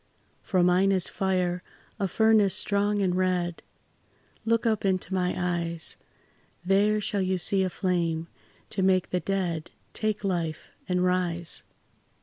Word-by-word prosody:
For 185 -3 +1
mine 180 +2 +4
is 185 -3 +2
fire 180 -2 0 0.4
a 195 - +1
furnace 215 0 +4
strong 205 0 +1
and 180 -2 +1
red; 180 -2 0 0.8
Look 230 +1 +2
up 220 -2 +1
into 190 -1 0
my 180 -1 0
eyes, 170 -2 -1 0.7
There 205 +3 +3
shall 205 -1 -1
you 185 0 0
see 190 +3 +1
a 185 - +1
flame 170 -3 -1 0.4
to - - 0
make 185 -1 +2
the 180 - +1
dead 175 -4 -2 0.2
Take 215 -1 -2
life 170 -5 -2 0.2
and 180 0 +1
rise. 175 -2 0
185 Hz, 135 wpm, -27 LUFS, 175-195 Hz, 0.8 s, mine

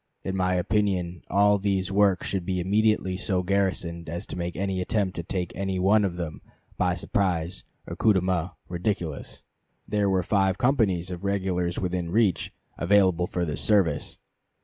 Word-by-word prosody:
"In 95 - -3
my 90 -1 +1
opinion 90 -2 0
all 100 0 +4
these 95 -2 0
works 100 -2 +3
should 95 -3 -1
be 90 +1 -2
immediately 100 0 +1
so 95 -2 -1
garrisoned 90 -4 -1
as 85 +2 -4
to - - -7
make 85 -1 -4
any 95 0 -1
attempt 95 -1 -1
to - - -1
take 90 +1 -4
any 95 -1 -2
one 100 +3 +4
of 95 -3 -1
them, 85 -4 -5 0.3
by 90 -1 +1
surprise 90 0 -1 0.2
or - - -6
coup 110 - +4
de 95 - +2
main, 90 -1 0 0.2
ridiculous." 85 -4 -3 0.4
There 105 -2 +1
were 95 -1 +2
five 95 0 +2
companies 105 -10 +1
of 90 +1 -6
regulars 95 -3 -1
within 90 -2 -2
reach, 100 -1 +1 0.3
available 90 0 +3
for 90 -1 -2
this 75 - -4
service. 90 -9 +1
95 Hz, 170 wpm, -26 LUFS, 90-100 Hz, 0.4 s, all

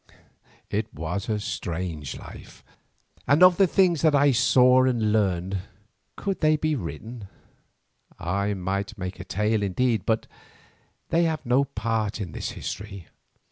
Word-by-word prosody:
It - - -2
was 90 +7 -4
a 105 -1 0
strange 85 - -4
life, - - -12 0.6
and 145 +6 +5
of 180 -1 +7
the 195 - +5
things 180 -3 +3
that 155 -2 +4
I 145 0 +5
saw 125 +1 +5
and 115 -5 +1
learned, 95 -2 0 0.6
could 195 -2 -3
they 155 -1 +4
be 155 +1 0
written, 105 - -7 0.9
I 100 +4 -1
might 100 +3 -3
make 95 0 -6
a - - -5
tale 105 +3 0
indeed, 110 +2 0
but 110 0 +1 0.8
they 170 +1 +3
have 160 -3 -2
no 125 +3 +3
part 110 -4 -2
in 95 -6 -5
this - - -4
history. 100 -2 -7
110 Hz, 140 wpm, -25 LUFS, 95-135 Hz, 0.9 s, of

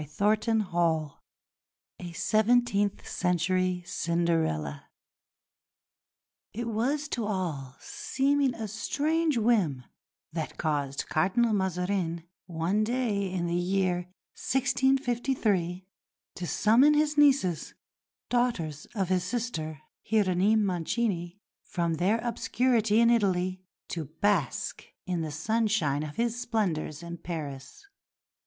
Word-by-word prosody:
CHAPTER 215 +2 +2
XV 170 -6 0 0.9
A 175 -1 -7
SEVENTEENTH 215 +2 +2
CENTURY 180 0 0
CINDERELLA 165 - -1 1.7
It 235 +1 -3
was 265 +7 0
to 235 -6 -2
all 155 -10 -3
seeming 275 -1 0
a 220 -1 -4
strange 300 +8 0
whim 205 - +2 0.5
that 160 -2 -4
caused 145 -4 -1
Cardinal 220 +8 +2
Mazarin, 180 -3 -1 0.2
one 175 +5 0
day 215 -5 -1
in 180 -2 -1
the 170 - -1
year 180 0 0 0.3
1653, 245 -8 +1 0.5
to 180 - -5
summon 240 - +5
his 300 0 +2
nieces, 270 - +3 0.5
daughters 180 - -1
of 190 -4 -1
his 185 -1 +2
sister, 175 - -3 0.2
Hieronyme 205 0 +2
Mancini, 180 0 -1 0.2
from 170 -2 -2
their 185 +7 +2
obscurity 235 -2 +1
in 235 0 +5
Italy 185 -4 +1 0.3
to 165 -3 -3
bask 160 - -1 0.2
in 180 -2 -1
the 160 - -3
sunshine 185 -3 0
of 150 -1 -6
his 235 +1 -1
splendours 175 -10 -1
in 170 0 -7
Paris. 145 - -7
190 Hz, 105 wpm, -28 LUFS, 170-230 Hz, 1.7 s, summon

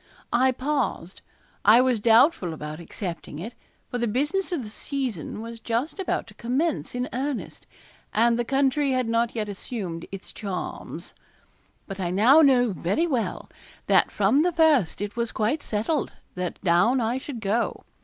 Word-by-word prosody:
I 260 +2 +4
paused, 260 - -2 0.4
I 220 +4 +7
was 250 -3 +3
doubtful 225 - +4
about 150 +1 -7
accepting 170 -3 -6
it, 215 +9 -6 0.4
for 245 - -2
the 235 - 0
business 295 - 0
of 325 -8 -1
the 215 - -7
season 230 - -4
was 230 0 -8
just 235 - -2
about 385 - -1
to - - -15
commence 265 +5 -1
in 250 +1 -1
earnest, 270 +1 -4 0.4
and 235 +2 +3
the - - +2
country 275 +2 +1
had 255 -2 0
not 230 +1 +1
yet 215 -2 -2
assumed 190 -4 -5
its 195 -1 -8
charms. 195 -4 -6 0.7
But 195 -1 -7
I 180 -2 -1
now 230 - +6
know 250 -5 +5
very 185 - 0
well 255 -9 -2 0.4
that - - +4
from 210 +8 +3
the 355 +2 +2
first 310 - +3
it 205 +1 -4
was 235 -1 -1
quite 225 +8 0
settled 230 +8 -1 0.2
that 180 -1 -4
down 195 +9 +4
I 235 +2 0
should 265 -3 -7
go. 220 +3 -1
235 Hz, 165 wpm, -25 LUFS, 205-270 Hz, 0.7 s, I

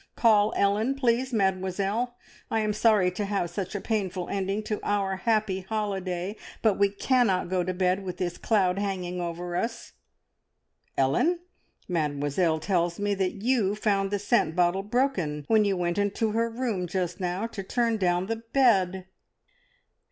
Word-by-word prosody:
Call 215 -2 +4
Ellen, 210 +6 +2
please, 255 -1 +1
Mademoiselle. 195 +3 0 0.3
I 225 - +1
am 215 -1 0
sorry 210 -4 +3
to 185 +3 -3
have 195 -4 -1
such 185 +2 -4
a - - -1
painful 190 -4 -2
ending 195 +2 -1
to 215 0 -3
our 195 -2 0
happy 215 -2 +1
holiday, 190 -1 -3 0.3
but 215 -4 +3
we 200 0 +4
cannot 200 -3 +1
go 185 -1 +1
to 185 - -2
bed 185 +1 0
with 180 -1 -5
this 180 -2 -3
cloud 195 -4 +2
hanging 180 -3 -3
over 175 +1 -4
us. 230 +5 -3 1.0
Ellen, 225 - +2 0.5
Mademoiselle 155 0 0
tells 175 0 0
me 205 0 0
that 195 +1 -2
you 225 -5 +2
found 200 -2 +1
the 205 - 0
scent 205 -5 +1
bottle 180 +1 +2
broken 195 - -1
when 220 -1 +4
you 195 -2 +1
went 175 +2 -1
into 205 +2 0
her 230 +2 +1
room 225 -6 -2
just 180 0 -2
now 180 +3 -2
to 225 -3 -5
turn 230 +3 0
down 180 -2 +1
the 225 +3 -2
bed!" 225 -6 +2
195 Hz, 160 wpm, -27 LUFS, 180-220 Hz, 1.0 s, Call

